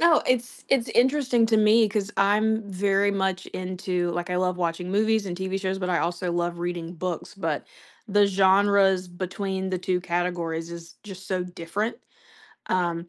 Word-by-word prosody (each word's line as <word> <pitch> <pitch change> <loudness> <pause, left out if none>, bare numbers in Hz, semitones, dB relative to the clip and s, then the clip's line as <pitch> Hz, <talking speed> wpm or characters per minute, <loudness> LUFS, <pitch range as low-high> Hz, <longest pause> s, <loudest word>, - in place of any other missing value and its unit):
know. 335 -2 +5
It's 245 -1 -1
it's 260 -3 +2
interesting 255 -2 +3
to 220 -1 +3
me 215 +1 +5
'cause 205 -1 -2
I'm 215 +3 +2
very 200 +1 +2
much 190 -1 -1
into 180 -1 -2
like, 175 +1 -3
I 180 - 0
love 180 0 0
watching 175 +1 -2
movies 215 +1 +2
and 175 -2 -4
TV 190 +1 -2
shows, 190 0 -2
but 185 -1 -2
I 175 - +2
also 175 +1 -1
love 175 0 -1
reading 175 -1 -4
books. 175 0 -4
But 165 -6 -3 0.4
the 205 0 +4
genres 195 -1 +4
between 190 +1 -4
the 185 - -1
2 180 0 -1
categories 170 -2 -2
is 170 0 -9
just 190 -2 -10
so 185 -2 -1
different. 180 +5 -3 0.7
Um 170 -2 -1
185 Hz, 170 wpm, -25 LUFS, 175-205 Hz, 0.7 s, know